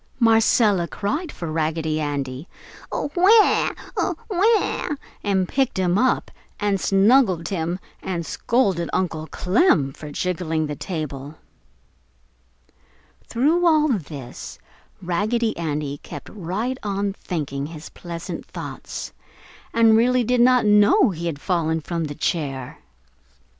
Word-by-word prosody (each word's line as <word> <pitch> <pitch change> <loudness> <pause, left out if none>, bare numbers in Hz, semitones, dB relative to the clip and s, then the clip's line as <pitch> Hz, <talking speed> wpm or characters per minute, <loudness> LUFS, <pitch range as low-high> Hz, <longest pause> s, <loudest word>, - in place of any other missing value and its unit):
Marcella 225 -5 +4
cried 295 - -3
for 170 -2 -6
Raggedy 155 0 -1
Andy, 140 0 -3 0.4
"AWAA! 380 +8 +4 0.2
AWAA!" 405 -6 0 0.3
and 190 -2 +1
picked 265 -1 0
him 180 -1 +2
up 255 +6 +1 0.3
and 205 -2 0
snuggled 195 -4 +3
him 175 -2 -2 0.2
and 170 -3 -3
scolded 195 -8 0
Uncle 160 -4 -1
Clem 180 - +2
for 150 - -9
jiggling 165 -1 -1
the 150 -1 -4
table. 150 -4 -5 1.9
Through 305 +9 +2
all 310 -3 +4
this 145 - -5 0.5
Raggedy 215 +6 0
Andy 150 -3 -3
kept - - -9
right 215 +7 -3
on 200 -1 -2
thinking 145 -7 -4
his 160 -1 -9
pleasant 170 -1 -7
thoughts, - - -7 0.6
and 225 -1 +5
really 250 +2 +3
did 245 +1 +2
not 250 -1 +5
know 210 - +5
he 170 -1 -4
had 150 -4 -3
fallen 160 -1 0
from 165 +1 -3
the 145 -1 -6
chair. 140 -5 -3
185 Hz, 115 wpm, -22 LUFS, 160-230 Hz, 1.9 s, and